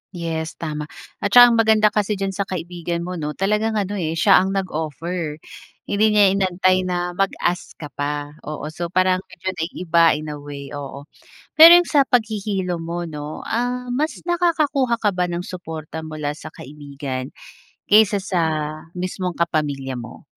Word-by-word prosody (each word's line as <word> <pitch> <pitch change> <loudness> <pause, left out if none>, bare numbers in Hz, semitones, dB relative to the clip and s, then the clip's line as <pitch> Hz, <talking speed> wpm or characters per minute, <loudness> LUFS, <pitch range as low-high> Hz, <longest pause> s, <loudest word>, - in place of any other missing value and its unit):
Yes, 160 -2 -4
tama 150 -2 -5 0.3
at 205 - -1
tsaka 245 0 +10
ang 230 - +2
maganda 220 -1 +4
kasi 210 0 0
diyan 195 0 -2
sa 195 +1 -3
kaibigan 170 -1 -4
mo, 180 0 -5
'no, 150 -1 -4
talagang 210 +3 0
ano, 205 -1 -2
eh, 160 -2 -2
siya 165 - +5
ang 190 +1 -1
nag-offer, 165 -2 -3 0.5
hindi 205 +1 +1
niya 205 -2 +6
inantay 185 -1 +1
na 175 0 -2
mag-ask 180 -1 -2
ka 150 -3 -9
pa, 145 +1 -3 0.2
oo. 155 0 -5
So, 170 +2 -4
parang 185 +1 +2
medyo 185 0 -5
naiiba, 170 -1 +2
in 155 0 -5
a 150 - -7
way, 140 -1 -9
oo. 140 -1 -7 0.6
Pero 335 +2 +12
yun, 350 - -1
sa 280 -3 +3
paghihilom 205 -7 -1
mo, 170 +1 -4
'no, 150 -2 -7
ah, 245 +1 -2
mas 295 +6 -1
nakakakuha 310 -8 +1
ka 210 -2 +2
ba 180 -1 -1
ng 175 0 -3
suporta 160 -4 -7
mula 155 -2 -4
sa - - -10
kaibigan 140 -2 -7 0.6
kaysa 210 -1 +5
sa 185 -2 -1 0.5
mismong 180 0 -3
kapamilya 145 -5 -1
mo? 120 - -10
180 Hz, 160 wpm, -21 LUFS, 155-205 Hz, 0.6 s, Pero